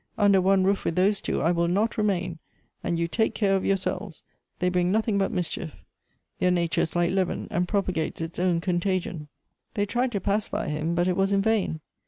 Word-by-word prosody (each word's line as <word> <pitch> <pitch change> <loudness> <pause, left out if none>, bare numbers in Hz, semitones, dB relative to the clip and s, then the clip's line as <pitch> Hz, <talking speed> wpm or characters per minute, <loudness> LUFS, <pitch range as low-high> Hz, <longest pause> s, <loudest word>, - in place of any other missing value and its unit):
Under 200 -2 +4
one 190 0 +3
roof 195 +1 +1
with 165 - -1
those 195 +2 +2
two - - -1
I 165 - +3
will 170 -1 +1
not 205 +6 +1
remain, 185 -5 -1 0.4
and 170 - -1
you 170 0 0
take 220 +6 0
care 195 -3 +2
of 190 - 0
yourselves. 195 -2 -2 0.3
They 180 - 0
bring 180 0 +1
nothing 215 -1 +1
but 195 - +1
mischief; 175 -3 -3 0.6
their 180 - +3
nature 170 -2 +1
is 160 - -2
like 175 0 +2
leaven, 185 -1 -1
and 175 +1 0
propagates 185 -6 -1
its 165 +1 -5
own 175 -2 +1
con 175 -1 0
tagion." 175 -4 -2 0.5
They 205 - +1
tried 240 +5 0
to 200 - 0
pacify 200 -1 -1
him, 155 +3 -1
but 175 +1 +2
it 180 - +1
was 195 0 +1
in 195 0 +2
vain. 205 -8 0
185 Hz, 210 wpm, -26 LUFS, 170-200 Hz, 0.6 s, Under